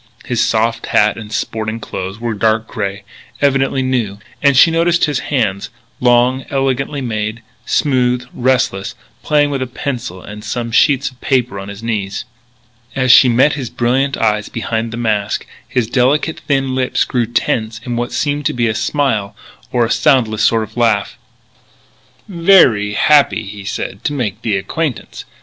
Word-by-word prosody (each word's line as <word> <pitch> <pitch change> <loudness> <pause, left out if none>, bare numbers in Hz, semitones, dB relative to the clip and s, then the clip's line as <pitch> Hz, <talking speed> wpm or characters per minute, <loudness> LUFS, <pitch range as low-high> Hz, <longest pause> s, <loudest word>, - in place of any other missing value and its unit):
His 120 -2 0
soft 115 +1 0
hat 105 0 +3
and 105 -1 -9
sporting 110 0 -3
clothes 95 -1 -6
were 115 -1 -2
dark 110 +1 +1
grey, 100 -1 -4 0.4
evidently 135 -1 +1
new. 120 -6 -1 0.2
And 140 -2 +4
she 165 - +7
noticed 170 +1 +2
his 145 -3 -1
hands 105 -9 -1 0.3
long, 125 +1 +3
elegantly 135 +1 -1
made, 110 -1 -3 0.2
smooth, 125 -3 +1
restless, 125 -6 0 0.3
playing 145 -1 +2
with 135 -2 -2
a 130 - -2
pencil 120 -7 -5
and 105 +3 -10
some 115 +2 -4
sheets 140 +3 +3
of 125 - -24
paper 125 -6 0
on 95 - -7
his 100 +2 -9
knees. 105 -4 -3 0.7
As 130 -2 +3
she 125 +1 +7
met 130 +5 +4
his 135 -5 -4
brilliant 130 +3 0
eyes 105 -1 0
behind 115 0 -3
the 115 - -5
mask, 105 -3 -1 0.2
his 125 -3 0
delicate, 130 +7 +1
thin 135 -2 +1
lips 130 -1 +1
grew 120 -3 -1
tense 115 -1 -1
in 120 -2 -3
what 120 +1 -2
seemed 145 -1 -1
to - - -2
be 120 -1 0
a 110 - 0
smile 110 -5 -1 0.4
or 120 -2 +2
a 115 - -3
soundless 120 -8 +2
sort 115 -1 +3
of 110 0 -11
laugh. 115 -4 +1 1.1
"Veree 165 - +4
happee," 145 -4 +4
he 100 0 -9
said, 100 0 -5
"to 145 - 0
make 115 -6 -3
the 110 -4 0
acquaintance. 145 +7 -4
120 Hz, 165 wpm, -16 LUFS, 110-135 Hz, 1.1 s, she